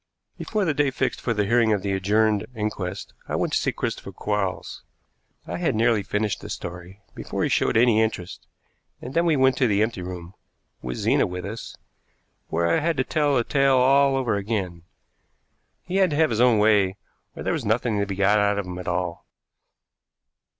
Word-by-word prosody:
Before 215 -3 -2
the 160 - +1
day 145 -1 +2
fixed 135 - -2
for 120 - -1
the 105 -2 0
hearing 115 +1 +3
of 100 - -1
the 100 - -1
adjourned 105 +2 +1
inquest 105 -4 -4
I - - -2
went - - -1
to - - +3
see - - 0
Christopher - - -4
Quarles. 105 -3 -3 0.6
I 85 +1 -5
had 90 - 0
nearly 115 -1 +2
finished 105 +1 -2
the - - -9
story 90 +4 -8
before - - -4
he - - +1
showed - - +2
any 115 -2 +4
interest, 110 -6 -3 0.5
and 125 - -8
then 170 +2 +2
we 160 - +3
went 130 -1 +3
to 125 - +3
the 105 -1 +2
empty 110 -4 -3
room, 90 0 -7 0.5
with 60 -1 -5
Zena - - +2
with 90 0 -6
us, 110 +3 -7 0.7
where 85 +1 -1
I 85 - +2
had 165 0 -1
to 130 - +2
tell 145 0 +1
the 120 - +2
tale 135 +1 +2
all 135 +2 +4
over 130 -5 0
again. 95 -5 -3 1.0
He 185 +1 -3
had 190 -2 +4
to 150 - -2
have 155 -2 +3
his 115 +1 +1
own 125 -3 +5
way, 105 -3 +3 0.4
or - - -7
there - - 0
was - - -2
nothing 110 0 0
to 100 - -1
be 100 - -4
got 100 +2 +3
out 100 0 +2
of 100 - -2
him 90 0 -7
at 90 - -8
all. 90 -1 -3
105 Hz, 200 wpm, -24 LUFS, 95-125 Hz, 1.0 s, own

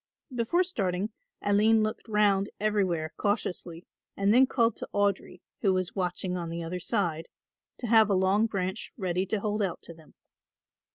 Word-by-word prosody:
Before 250 +10 +2
starting 200 - -2 0.3
Aline 215 +2 +4
looked 215 +2 -3
round 205 -2 +2
everywhere 190 -7 0
cautiously 180 -4 -2 0.3
and 200 +1 +3
then 260 +2 +6
called 235 -3 +2
to - - -7
Audry, 200 -3 0 0.2
who 195 -2 +3
was 185 -1 -1
watching 180 -1 -2
on 170 -2 -4
the 170 0 -4
other 175 +2 -4
side, 175 -4 -1 0.5
to - - -6
have 220 -2 +5
a 200 - +3
long 190 +4 +3
branch 190 0 -3
ready 185 -2 -1
to 215 - -1
hold 210 0 -1
out 190 -4 -2
to 170 - -8
them. 160 -2 -19
200 Hz, 165 wpm, -28 LUFS, 180-215 Hz, 0.5 s, then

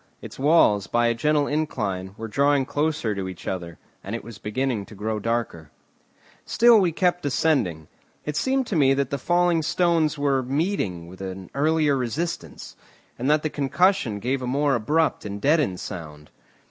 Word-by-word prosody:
Its - - -11
walls, 135 - +4
by 120 0 +1
a 115 - +3
gentle 145 +5 +1
incline, 100 -11 -2
were 115 - -5
drawing 140 +4 +2
closer 145 -6 -1
to 95 -2 -4
each 90 - -10
other, 85 -3 -4 0.3
and 100 +4 -4
it 115 - -6
was 115 -2 -11
beginning 115 0 -2
to 105 - -13
grow 105 +2 -3
darker. 115 -9 -3 0.7
Still 235 -1 +5
we 180 -4 +2
kept 175 +1 +1
descending. 130 - 0 0.4
It 150 - -3
seemed 265 - +1
to 205 - -3
me 135 -3 +4
that 140 -1 -1
the 140 - -2
falling 175 +2 +2
stones 165 -1 +1
were 140 -2 +1
meeting 130 - -2
with 95 +2 -12
an 95 -1 -7
earlier 150 0 +2
resistance, 130 - -4 0.4
and 130 +4 -1
that 150 0 +3
the 155 - 0
concussion 145 - +1
gave 130 +6 -2
a 125 - -4
more 140 +2 +1
abrupt 150 +7 +1
and 100 -1 -5
deadened 140 - +2
sound. 75 -5 -8
135 Hz, 170 wpm, -24 LUFS, 105-155 Hz, 0.7 s, Still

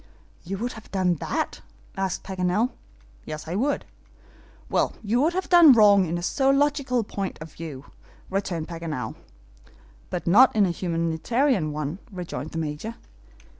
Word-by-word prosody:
"You 195 +3 -4
would 240 +5 -3
have 220 - -12
done 185 -2 +2
that?" - - -2 0.3
asked 190 -1 -2
Paganel. 190 +5 0 0.5
"Yes, 155 +1 -7
I 165 - -3
would." 270 +9 0 0.8
"Well, - - +1
you 225 +4 +1
would 320 +4 +2
have 375 +1 -2
done 345 -6 +8
wrong 205 -5 +6
in 170 +2 -2
a 175 - -5
zoological 275 0 +2
point 200 -2 -4
of 155 -1 -10
view," 145 -5 -8 0.4
returned 185 -4 -2
Paganel. 160 -9 -4 1.0
"But 180 - -4
not 220 +10 +6
in 210 -2 +5
a 180 - 0
humanitarian 170 - 0
one," 150 +4 -4
rejoined 175 -5 -5
the 165 - -7
Major. 160 +8 -4
190 Hz, 145 wpm, -25 LUFS, 165-240 Hz, 1.0 s, done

